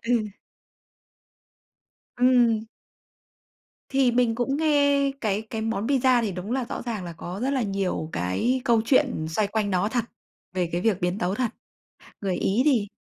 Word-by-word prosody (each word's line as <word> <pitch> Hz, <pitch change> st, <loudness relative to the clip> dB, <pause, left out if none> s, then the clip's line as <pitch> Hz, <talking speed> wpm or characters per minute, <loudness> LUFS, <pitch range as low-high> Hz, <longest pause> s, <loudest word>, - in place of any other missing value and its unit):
Ừ. 235 Hz, -3 st, +2 dB, 1.9 s
Ừm. 240 Hz, -3 st, +4 dB, 1.2 s
Thì 265 Hz, -2 st, +3 dB
mình 240 Hz, -1 st, +2 dB
cũng 250 Hz, +4 st, -1 dB
nghe 285 Hz, -3 st, +3 dB
cái 210 Hz, -2 st, 0 dB
cái 220 Hz, 0 st, -6 dB
món 225 Hz, -1 st, -2 dB
pizza 260 Hz, -2 st, +3 dB
thì 215 Hz, -4 st, -1 dB
đúng 185 Hz, +4 st, -6 dB
là 260 Hz, -1 st, 0 dB
rõ -, -, -4 dB
ràng 225 Hz, -6 st, -4 dB
là 170 Hz, -, -6 dB
có 175 Hz, +4 st, -7 dB
rất 260 Hz, -, 0 dB
là 275 Hz, -2 st, 0 dB
nhiều 195 Hz, -5 st, -2 dB
cái 95 Hz, -, 0 dB
câu 230 Hz, -2 st, +4 dB
chuyện 255 Hz, -, +2 dB
xoay 205 Hz, +6 st, 0 dB
quanh 205 Hz, 0 st, -1 dB
nó 185 Hz, +3 st, +1 dB
thật, 240 Hz, -1 st, 0 dB, 0.5 s
về 180 Hz, -2 st, -1 dB
cái 175 Hz, +1 st, -1 dB
việc 210 Hz, -3 st, +1 dB
biến 180 Hz, +2 st, 0 dB
tấu 180 Hz, +1 st, -1 dB
thật. 240 Hz, -1 st, -1 dB, 0.7 s
Người 190 Hz, -3 st, -1 dB
Ý 205 Hz, +8 st, +1 dB
thì 245 Hz, -9 st, +2 dB
225 Hz, 165 wpm, -25 LUFS, 195-255 Hz, 1.9 s, Ừm